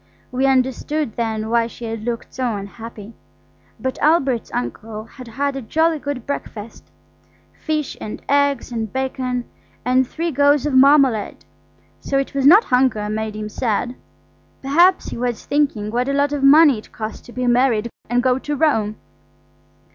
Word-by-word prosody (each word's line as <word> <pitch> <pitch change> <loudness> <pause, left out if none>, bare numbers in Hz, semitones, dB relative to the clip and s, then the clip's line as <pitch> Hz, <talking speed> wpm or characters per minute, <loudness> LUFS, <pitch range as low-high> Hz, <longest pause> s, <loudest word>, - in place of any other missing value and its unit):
We 260 +2 +1
understood 265 +1 0
then 220 -2 -2
why 235 -1 +2
she 235 0 -9
had 225 -1 -5
looked 235 -1 -4
so 250 -4 -1
unhappy. 210 +2 -9 0.7
But 260 0 -3
Albert's 275 -7 +2
uncle 215 - -5
had 250 +2 -12
had 275 +4 -2
a 270 - -4
jolly 320 +7 +1
good 285 -4 -5
breakfast–fish 285 +5 -7
and 210 - -6
eggs 285 -3 +1
and 225 -3 -3
bacon 255 -2 -2 0.4
and 255 +1 +3
three 335 +4 -3
goes 285 0 +3
of 295 - -1
marmalade. 265 -5 +4 0.5
So 275 - -1
it 275 - -2
was 275 -1 +2
not 395 +9 +8
hunger 250 -5 +1
made 215 0 -3
him 215 0 -4
sad. 235 +2 -2 0.7
Perhaps 345 +7 +3
he - - -6
was 245 -2 -2
thinking 275 -8 0
what 245 +3 0
a - - 0
lot 285 +1 +1
of 290 - -2
money 280 -2 +6
it - - -16
cost 220 0 -6
to - - -12
be 250 +1 -3
married 240 -2 +2 0.2
and 245 +1 +1
go 255 0 +2
to 295 +2 -3
Rome. 225 -9 +1
255 Hz, 160 wpm, -20 LUFS, 225-285 Hz, 0.7 s, not